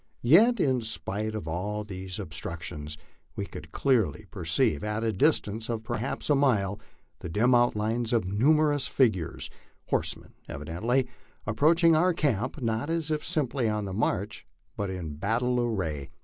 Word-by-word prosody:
Yet 210 - +6
in 130 -7 +2
spite 110 -1 -3
of 105 -7 -5
all 100 +6 -3
these 95 -3 -6
obstructions 80 -2 -5 0.4
we - - -3
could - - -10
clearly 115 - +1
perceive, 75 -1 +2
at 105 +1 -2
a 110 -1 0
distance 115 -7 +1
of 115 -2 -2
perhaps 120 +3 -3
a 150 - +4
mile, 105 -8 +2 0.4
the 90 - -6
dim 115 +9 +3
outlines 115 -1 +2
of 115 -5 +2
numerous 145 +8 +3
figures 110 - 0 0.4
horsemen - - 0 0.2
evidently 90 - -1 0.4
approaching 160 +9 +4
our 175 +2 +3
camp, 130 -1 0
not 115 +5 -1
as 165 -2 0
if 155 -1 -1
simply 140 -8 0
on 105 -1 -1
the 95 - -5
march, 105 0 -1 0.3
but 100 -1 -2
in 85 -6 -5
battle 120 +7 0
array. 90 - -2
110 Hz, 150 wpm, -28 LUFS, 95-135 Hz, 0.4 s, Yet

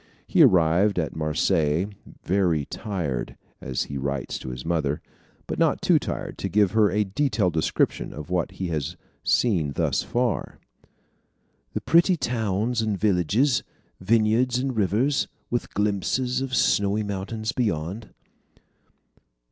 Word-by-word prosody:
He - - +3
arrived 90 +4 +4
at 80 -4 -1
Marseilles 75 +2 +1 0.3
"very 85 -6 +1
tired," 85 - -4 0.3
as 65 -1 -2
he 70 - -5
writes 70 0 -3
to - - -7
his 60 0 -7
mother, 75 -4 0 0.5
but - - -4
not - - +3
too - - +4
tired - - -5
to 95 - -2
give 100 0 +3
her 110 -1 +4
a 105 +3 +1
detailed 105 - 0
description 80 - 0
of 75 +3 -8
what 90 -2 0
he 95 -2 -4
has 75 -4 -3 0.3
seen 85 - +2
thus - - 0
far 120 -2 -2 1.1
"the - - -2
pretty 170 +2 +4
towns 115 -3 -1
and 110 -3 -1
villages, 105 - +2 0.4
vineyards 115 +5 +2
and 130 0 -2
rivers, 110 +7 +1 0.2
with 120 - -2
glimpses 105 +5 0
of 135 -1 -2
snowy 100 -3 +2
mountains 105 +3 -3
beyond." 105 -2 -2
100 Hz, 130 wpm, -25 LUFS, 80-115 Hz, 1.1 s, arrived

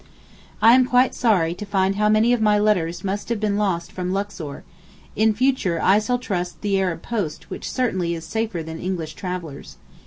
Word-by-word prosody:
I 225 +1 +8
am 255 0 +5
quite 250 0 +3
sorry 185 -9 +2
to 195 - -8
find 195 -1 0
how 210 +1 +2
many 220 +3 +4
of 240 - 0
my 210 -1 +4
letters 195 -5 +1
must 200 +3 -3
have 235 -2 -1
been 210 -1 0
lost 190 -5 -1
from 180 0 -3
Luxor; 195 -7 -4 0.5
in 220 +1 +3
future 220 -7 +1
I 195 +5 +4
shall 245 +3 0
trust 180 -7 -4
the 200 -2 +1
Arab 180 -4 -2
post 195 -10 -4
which - - -5
certainly 185 -9 -1
is 165 - -7
safer 220 -7 -3
than 160 0 -7
English 170 -4 -4
travellers. 175 -5 -7
200 Hz, 190 wpm, -22 LUFS, 175-220 Hz, 0.5 s, I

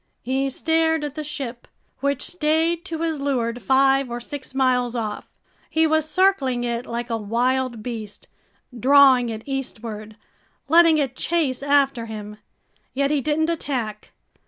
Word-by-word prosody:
He 265 +2 0
stared 320 +2 +1
at 295 -2 -4
the 305 0 -5
ship, 265 -5 -6 0.3
which 280 0 -1
stayed 325 0 0
to 330 -3 -4
his 320 -3 -1
leeward 245 -4 -1
five 270 +3 +3
or 240 0 -4
six 265 +2 -8
miles 250 -2 +1
off. 220 -3 -4 0.4
He 320 0 +2
was 315 -1 +1
circling 300 -10 +2
it 240 0 -3
like 235 +1 -4
a 230 - 0
wild 240 +2 -1
beast, 220 -4 -7 0.5
drawing 260 0 +5
it 220 0 -6
eastward, 225 -6 -5 0.5
letting 330 0 +6
it 270 -4 -1
chase 305 -7 0
after 275 -4 +2
him. 210 -1 -8 0.6
Yet 280 +1 +1
he 295 -2 +1
didn't 310 +3 +1
attack. 245 -10 -4
265 Hz, 145 wpm, -22 LUFS, 240-300 Hz, 0.6 s, letting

